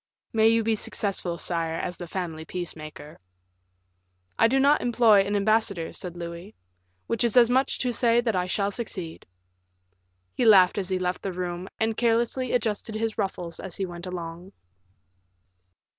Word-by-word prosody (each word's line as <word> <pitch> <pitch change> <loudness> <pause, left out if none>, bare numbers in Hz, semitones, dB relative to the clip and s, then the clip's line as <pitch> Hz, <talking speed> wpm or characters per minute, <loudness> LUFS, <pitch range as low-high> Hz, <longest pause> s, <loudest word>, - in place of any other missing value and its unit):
"May 220 0 +4
you 225 0 +3
be 225 +1 +1
successful, 195 -4 -2
sire, 165 -2 -2
as 175 +1 -3
the 175 - -7
family 165 -3 -4
peacemaker." 155 -3 -7 1.2
"I 225 - +6
do 265 +3 +2
not 285 +2 +4
employ 230 -4 +5
an 200 +1 -1
ambassador," 205 -4 +1
said 175 -1 -6
Louis, 170 +4 -8 0.5
"which 230 -1 -1
is 235 0 +1
as 240 -1 +6
much 260 +2 +2
as - - -3
to 250 - 0
say 235 0 +3
that 230 -3 0
I 180 0 0
shall 200 +2 0
succeed." 190 -7 -5 1.1
He - - -1
laughed 200 -4 +6
as 190 -1 -4
he 185 - +1
left 180 0 -2
the 195 - -4
room, 180 0 -4
and 220 0 +1
carelessly 235 +2 +1
adjusted 220 -2 -1
his 225 0 -2
ruffles 180 -4 -3
as 190 -3 -7
he 195 - -2
went 175 0 -8
along. 175 +1 -7
195 Hz, 165 wpm, -26 LUFS, 175-225 Hz, 1.2 s, I